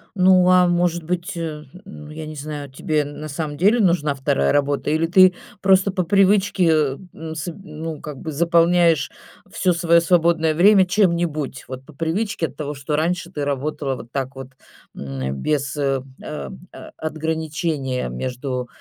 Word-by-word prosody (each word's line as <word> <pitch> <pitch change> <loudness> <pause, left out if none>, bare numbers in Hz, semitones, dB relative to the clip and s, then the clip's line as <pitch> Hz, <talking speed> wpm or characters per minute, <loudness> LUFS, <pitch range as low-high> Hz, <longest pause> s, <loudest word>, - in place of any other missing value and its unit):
Ну, 185 -1 +5
а 180 -1 +5
может 175 -1 +1
быть, 175 +1 -3
э, 155 -2 -5 0.2
ну, 150 -6 -11
я 155 +1 -7
не 155 0 -8
знаю, 145 -1 -6
тебе 150 +2 -1
на 145 +1 -7
самом 145 0 -4
деле 205 +9 +4
нужна 170 -7 +2
2 70 - +1
работа 145 0 0
или 160 +2 +1
ты 185 +2 +6 0.3
просто 195 0 +4
по 185 -1 -1
привычке, 195 0 +3
э, 150 -4 +2 0.2
н 160 0 -7
с 155 +3 -5
ну, 160 -4 -7
как 150 -3 -7
бы 155 - -6
заполняешь 170 -1 +3 0.4
всё 180 -2 +1
своё 170 0 +4
свободное 165 -2 +2
время 190 +2 +6
чем-нибудь, 170 -8 0
вот 130 0 -8
по 155 - -15
привычке 165 +4 -1
от 140 - -15
того, 150 -1 -4
что 140 +2 -3
раньше 170 +2 -1
ты 145 -5 -3
работала 140 0 -2
вот 120 -2 -11
так 135 -1 -3
вот, 135 -1 -8 0.5
м, 70 -1 -4
без, 145 -1 -1
э, 135 -2 0 0.2
а 150 - -6 0.2
а - - -11
отграничения 155 - -2
между, 125 - -4
155 Hz, 165 wpm, -21 LUFS, 145-175 Hz, 0.5 s, ты